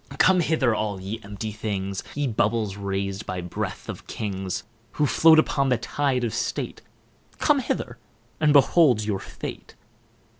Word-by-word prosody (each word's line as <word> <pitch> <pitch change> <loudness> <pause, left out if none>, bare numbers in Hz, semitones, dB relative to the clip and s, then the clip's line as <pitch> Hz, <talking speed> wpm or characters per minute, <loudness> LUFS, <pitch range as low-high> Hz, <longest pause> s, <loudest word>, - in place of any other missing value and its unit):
Come 185 +4 +5
hither, 150 -8 +2
all 105 -3 -2
ye 100 +4 -5
empty 105 +2 -6
things, 100 -3 -3
Ye 145 0 0
bubbles 110 -4 0
rais'd 100 0 -3
by 90 0 -3
breath 90 -1 -5
of - - -7
Kings; 95 -3 -4 0.3
Who 150 - +1
float 160 +5 +6
upon 140 -3 +2
the 125 - +3
tide 130 +1 -1
of 115 -4 -1
state, - - -3 0.6
Come - - +3
hither, - - -3 0.4
and 155 -1 +4
behold 140 -5 +5
your 105 -2 -1
fate. - - -8
110 Hz, 150 wpm, -25 LUFS, 100-140 Hz, 0.6 s, float